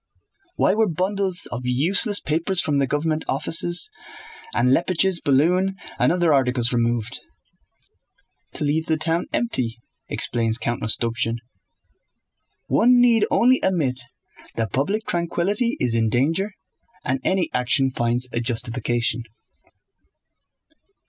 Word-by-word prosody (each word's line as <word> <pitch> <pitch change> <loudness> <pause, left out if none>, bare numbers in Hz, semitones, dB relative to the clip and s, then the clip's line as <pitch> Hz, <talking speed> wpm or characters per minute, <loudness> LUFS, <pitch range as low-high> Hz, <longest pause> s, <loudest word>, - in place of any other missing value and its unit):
"Why - - +2
were 220 -1 +2
bundles 185 +2 -1
of 115 - -4
useless 180 - +2
papers 165 +4 -1
from 150 -4 +1
the 135 - +1
government 155 +3 -1
offices, 170 - +1 0.6
and 125 - +1
Leppich's 175 +4 +1
balloon 180 +8 +2 0.2
and - - +3
other 175 -3 +2
articles 125 -3 +1
removed?" 120 0 -1 1.3
"To - - -4
leave 155 +2 0
the 160 - +1
town 165 +2 0
empty," 125 - -1 0.3
explains 115 -2 +1
Count 120 0 -3
Rostopchín. 115 +1 -1 1.3
One 245 +2 +4
need 235 -3 +4
only 255 +2 +4
admit 145 -9 0 0.5
that 110 -4 -3
public 200 +11 -1
tranquillity 180 +7 -1
is 125 -2 0
in 115 -1 +2
danger 165 - 0 0.5
and 130 +1 0
any 190 -1 0
action 130 +2 +1
finds 120 +1 0
a 120 - 0
justification. 120 0 -2
150 Hz, 115 wpm, -22 LUFS, 125-185 Hz, 1.3 s, One